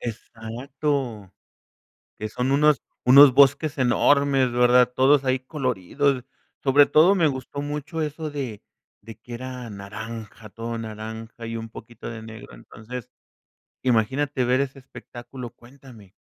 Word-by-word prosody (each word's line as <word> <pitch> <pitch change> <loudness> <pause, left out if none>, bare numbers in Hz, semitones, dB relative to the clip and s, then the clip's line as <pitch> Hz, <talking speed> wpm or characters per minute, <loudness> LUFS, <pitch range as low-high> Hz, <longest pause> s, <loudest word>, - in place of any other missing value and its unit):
Exacto, 120 -1 -4 0.9
que 110 - -5
son 125 +4 -2
unos 150 0 +4 0.2
unos 135 +1 +9
bosques 140 +3 +4
enormes, 135 +1 +3
¿verdad?, 125 0 +4
todos 135 +2 +4
ahí 130 0 +1
coloridos 130 - -1 0.4
sobre 145 +1 +5
todo 165 +7 +5
me 170 -5 +3
gustó 135 0 -5
mucho 145 +2 -4
eso 155 +1 -4
de 130 -8 -5 0.4
de 115 -1 -11
que 120 +3 -12
era 125 0 -7
naranja, 110 +2 -9
todo 115 +2 -5
naranja 110 +1 -8
y 115 - -5
un 115 0 -6
poquito 115 0 -10
de 115 -1 -8
negro 110 0 -11
entonces 120 +1 -10 0.7
imagínate 130 +3 +1
ver 125 +1 +2
ese 140 0 -4
espectáculo, 125 -1 -10
cuéntame. 120 -5 -17
125 Hz, 130 wpm, -24 LUFS, 115-140 Hz, 0.9 s, unos